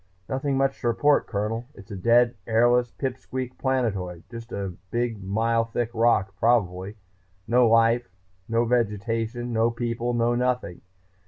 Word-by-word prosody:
"Nothing 135 +1 -1
much 135 0 0
to 120 - -1
report, 145 +5 +3
Colonel. 110 +3 -3
It's 100 0 -14
a - - -5
dead, 120 +5 +4
airless 120 +2 +3
pip 130 +1 -4
squeak 130 -1 -5
planetoid, 100 -10 -1
just 115 -1 -9
a 100 -2 -4 0.2
big 120 -3 -2
mile 115 +4 +1
thick 115 0 -3
rock, 110 -4 +2
probably. 100 -4 +1 0.5
No 120 0 +4
life, 115 0 +3 0.4
no 115 +1 +2
vegetation, 115 +1 -1
no 115 +1 +3
people, 120 0 -2
no 120 0 +2
nothing. 125 -6 -1
115 Hz, 145 wpm, -25 LUFS, 110-120 Hz, 0.5 s, dead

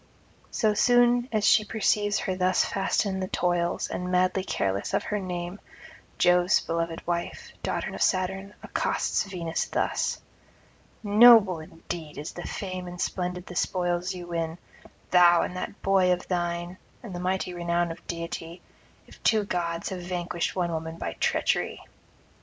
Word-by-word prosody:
So 215 -2 +1
soon 245 +2 +4
as 215 -2 +1
she 215 - +6
perceives 210 -1 +1
her 190 - -2
thus 185 0 +2
fast 195 +2 0
in 190 -1 -2
the 185 - -2
toils, 175 -1 0
and 180 - -4
[91 180 0 +3
124]madly 190 +1 -3
careless 95 0 -1
of - - 0
her 210 - -2
name, 180 0 -5 0.6
Jove's 180 +1 +4
beloved 165 0 -3
wife, 170 0 -3
daughter - - -2
of - - -6
Saturn, 195 +2 0
accosts - - 0
Venus 175 -4 -2
thus: - - -1 0.8
'Noble 210 -4 +7
indeed 160 0 -8
is 150 - -5
the 175 - -7
fame 185 -2 -5
and 175 0 -8
splendid 180 0 -2
the 180 - -9
spoils 175 +1 0
you 175 -1 -7
win, 165 -1 -3 0.5
thou 175 -1 +6
and 180 - -4
that 185 +2 -5
boy 190 -2 +4
of 180 0 -1
thine, 175 0 -2 0.2
and 215 -6 -8
mighty 185 0 -1
the 175 - -8
renown 170 0 0
of 165 - -11
deity, 170 0 -6 0.4
if - - -17
two 220 -2 +3
gods 170 -3 -2
have 185 -1 -5
vanquished 175 -1 -3
one 175 -2 0
woman 160 0 -4
by - - -4
treachery. - - 0
180 Hz, 160 wpm, -27 LUFS, 170-195 Hz, 0.8 s, Noble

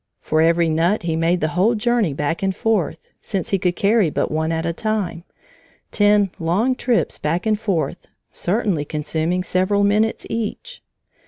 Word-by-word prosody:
For 155 0 0
every 165 +1 +3
nut 170 +6 +1
he 165 -2 -1
made 165 +2 +1
the 155 - +1
whole 190 +9 +2
journey 225 -5 +1
back 150 +6 -2
and 190 -1 0
forth, 200 -8 -1 0.2
since 190 -4 -4
he 195 - +2
could 180 -1 0
carry 200 -2 +3
but - - -2
one 160 +1 -1
at 165 0 -2
a 170 - -1
time, 205 -4 -2 0.7
ten 205 -2 +3
long 185 +10 +1
trips 245 -2 0
back 165 +4 -1
and 215 -1 +1
forth, 185 -5 -2 0.2
certainly 190 -5 -1
consuming 155 +4 -2
several 185 +3 +1
minutes 210 +2 +1
each. 230 - -5
185 Hz, 165 wpm, -21 LUFS, 165-215 Hz, 0.7 s, every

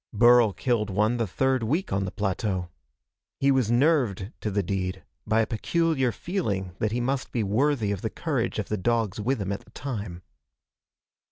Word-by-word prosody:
Burl 120 0 +6
killed 110 0 0
one 105 +5 +1
the 115 -2 0
third 130 +6 +1
week 155 - -1
on 95 0 0
the 95 - -4
plateau. 95 -3 -2 0.7
He 140 0 +4
was 130 -5 +2
nerved 120 - +2
to 105 - -1
the 100 0 0
deed 95 0 -3 0.2
by 110 +1 +3
a - - +2
peculiar 135 +3 +1
feeling 105 - -3
that 110 - 0
he 120 - -1
must 130 +2 -1
be 115 - 0
worthy 110 +1 +1
of 100 - -3
the - - -2
courage - - -2
of - - -2
the 105 - 0
dogs 110 0 0
with 130 +4 0
him 100 -1 -2
at 100 - -4
the - - -21
time. 105 -9 -6
110 Hz, 185 wpm, -26 LUFS, 100-130 Hz, 0.7 s, Burl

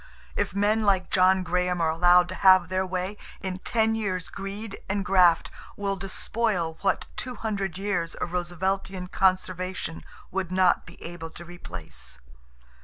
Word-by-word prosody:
If - - -1
men 210 +2 +2
like 195 -3 +2
John 185 0 +4
Graham 180 0 0
are 165 -1 +2
allowed 175 +2 +5
to - - -4
have 185 -2 +7
their 185 0 0
way, 185 +3 -3 0.2
in 185 -1 -4
ten 225 +2 +1
years 190 -6 -2
greed 195 +2 -6
and 200 0 -1
graft 180 -3 +4 0.3
will 200 -1 -1
despoil 195 -3 -1
what 195 - +1
two 250 -1 -4
hundred 200 -5 -3
years 190 -4 -1
of 175 - -4
Rooseveltian 180 +1 -2
conservation 185 -3 0 0.3
would 190 -1 -2
not 185 -1 +3
be - - -13
able 165 -1 -7
to 170 +1 -11
replace." 95 - -9
185 Hz, 150 wpm, -26 LUFS, 175-195 Hz, 0.3 s, have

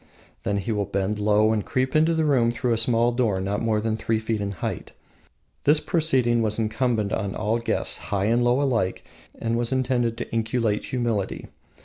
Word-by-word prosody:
Then 100 - -1
he 100 +3 -2
will 105 -3 -1
bend 100 +2 -1
low 105 +1 +3
and 105 -2 -1
creep 130 +5 -1
into 160 +2 +3
the 160 -1 +1
room 130 -6 +3
through 120 0 -1
a - - 0
small 120 +1 +2
door 115 -6 0
not 100 +2 -2
more 110 -2 +1
than 110 0 -1
three 110 0 0
feet 110 -1 -2
in 100 0 -3
height. 90 - -5 0.7
This 150 +2 +5
proceeding 130 -10 +1
was 110 -1 0
incumbent 110 -1 0
on 100 0 -2
all 110 +2 0
guests, 115 - 0
high 100 -1 0
and 120 +3 +2
low 120 +2 +3
alike, 115 -9 -1 0.3
and 115 0 -1
was 120 +1 -1
intended 125 -3 0
to 120 - -6
inculcate 115 -1 0
humility. 115 -6 -2
115 Hz, 195 wpm, -24 LUFS, 105-125 Hz, 0.7 s, This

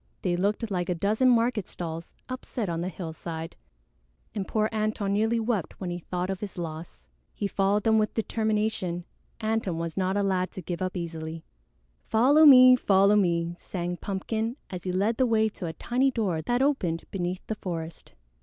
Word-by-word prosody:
They 180 -2 +1
looked 205 +4 -1
like 180 -2 -1
a 180 - +1
dozen 215 +8 +2
market 230 -4 +2
stalls 165 -1 -6
upset 250 -5 -4
on 165 0 -2
the 180 - -2
hillside, 165 -2 -6 0.8
and 195 -3 -3
poor 215 -1 +1
Antone 215 -2 0
nearly 220 +3 +2
wept 220 -6 -2
when 180 -2 -3
he 175 - -4
thought 180 +2 -3
of 190 - -4
his 200 -3 -6
loss. 165 -1 -7 0.3
He - - -3
followed 200 +1 +1
them 220 -1 +4
with 215 -1 0
determination. 215 -5 -1 0.4
Antone 220 -6 0
was 165 0 -4
not 190 +1 0
a 200 - +2
lad 185 -2 +1
to 185 - -6
give 175 +2 -4
up 185 0 -2
easily. 165 -1 -5 0.6
"Follow 285 +8 +6
me! 255 -2 +10
Follow 200 -3 +4
me!" 170 -3 +1
sang 175 -1 -4
Pumpkin, 220 +5 -3 0.2
as 180 -1 -6
he 185 - -1
led 205 +5 +1
the 260 - +3
way 220 -1 +3
to 185 -4 -6
a 160 - -4
tiny 250 - +1
door 205 -10 -1
that 245 - +1
opened 180 - 0
beneath 180 -1 -3
the - - -2
forest. 165 -5 -6
195 Hz, 180 wpm, -27 LUFS, 175-220 Hz, 0.8 s, me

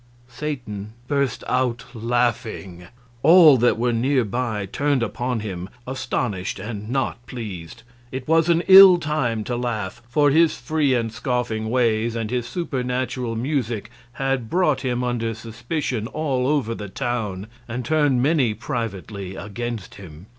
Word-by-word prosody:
Satan 120 -6 -5
burst 140 -2 0
out 125 -1 0
laughing. 115 -6 -2 0.3
All 160 0 +8
that 120 0 +3
were 120 +1 +1
near 125 +2 +2
by 110 -2 -2
turned 140 +5 0
upon 125 -1 -2
him, 95 -3 -5 0.2
astonished 125 -7 -2
and 105 +1 -6
not 130 -2 -2
pleased. 95 -9 -7 0.3
It 130 0 -6
was 165 +1 +3
an 170 0 +3
ill 190 -1 +10
time 150 -9 -1
to 120 - -3
laugh, 110 -5 -3
for 145 +3 +3
his 160 +2 +4
free 145 0 +1
and 115 -2 -1
scoffing 120 -3 -2
ways 115 -2 +1
and 115 -1 -3
his 125 -1 -1
supernatural 125 -6 -2
music 120 -4 -2 0.2
had 135 -2 -1
brought 155 -7 +2
him 125 -2 -1
under 115 -2 -1
suspicion 115 +1 -4
all 135 -3 -1
over 135 -6 +1
the 105 -3 -7
town 105 -5 -3 0.2
and 120 +1 -4
turned 145 -5 +2
many 135 -7 +2
privately 100 -4 -5
against 110 +1 -5
him. 85 -3 -12
120 Hz, 140 wpm, -22 LUFS, 110-135 Hz, 0.3 s, ill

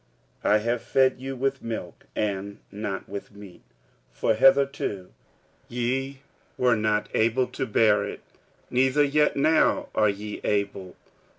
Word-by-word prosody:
46:003:002 - - +2
I 105 - +6
have 115 +2 -1
fed 130 -1 +2
you 135 0 -5
with 135 +1 -1
milk, 110 -7 -6
and 100 -1 -2
not 100 -2 -5
with 100 0 -7
meat: 100 -3 -13 0.5
for 110 - +1
hitherto 135 -6 +2 0.6
ye 130 +3 -2 0.4
were 125 -2 +3
not 105 -1 0
able 115 +3 +2
to 130 - -4
bear 105 -1 +3
it, - - -6 0.5
neither 130 +3 +3
yet 150 +1 +2
now 155 +3 +3
are 110 -1 +3
ye 105 +1 -5
able. 100 -3 -2
115 Hz, 135 wpm, -25 LUFS, 105-135 Hz, 0.6 s, I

